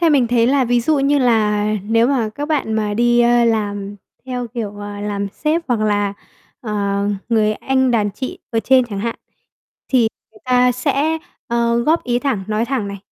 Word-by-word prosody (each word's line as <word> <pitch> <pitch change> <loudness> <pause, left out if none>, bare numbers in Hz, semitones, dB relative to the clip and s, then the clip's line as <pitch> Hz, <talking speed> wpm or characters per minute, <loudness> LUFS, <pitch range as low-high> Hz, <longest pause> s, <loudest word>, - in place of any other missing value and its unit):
Theo 335 -2 +4
mình 270 -5 +4
thấy 235 -1 +3
là 270 0 +3
ví 245 0 +2
dụ 295 +4 +1
như 280 +1 +2
là 215 -4 +2 0.2
nếu 230 +3 +2
mà 250 -5 +1
các 290 +1 -4
bạn 290 -8 0
mà 210 -1 -1
đi, 240 +2 +3
ơ, 240 0 +4
làm 205 -3 -1 0.3
theo 250 -1 -3
kiểu, 225 -3 -5
ờ, 205 0 -7
làm 200 -1 -3
sếp 305 - -1
hoặc 235 -3 +1
là, 205 -1 +1 0.5
ờ, 220 -5 -5 0.6
người 215 -2 +2
anh 260 +3 +1
đàn 215 -4 +1
chị 255 +6 -6
ở 225 - 0
trên 260 +1 +4
chẳng 210 -4 -6
hạn, 230 +2 -3 0.7
thì 260 - +3 0.3
người - - -18
ta 250 -1 +3
sẽ, 285 +5 0 0.3
ờ, 235 0 +1
góp 310 +8 +1
ý 240 -1 +1
thẳng, 245 -8 -2
nói 215 +1 0
thẳng 240 -5 -2
này. 200 0 -6
235 Hz, 195 wpm, -19 LUFS, 215-260 Hz, 0.7 s, Theo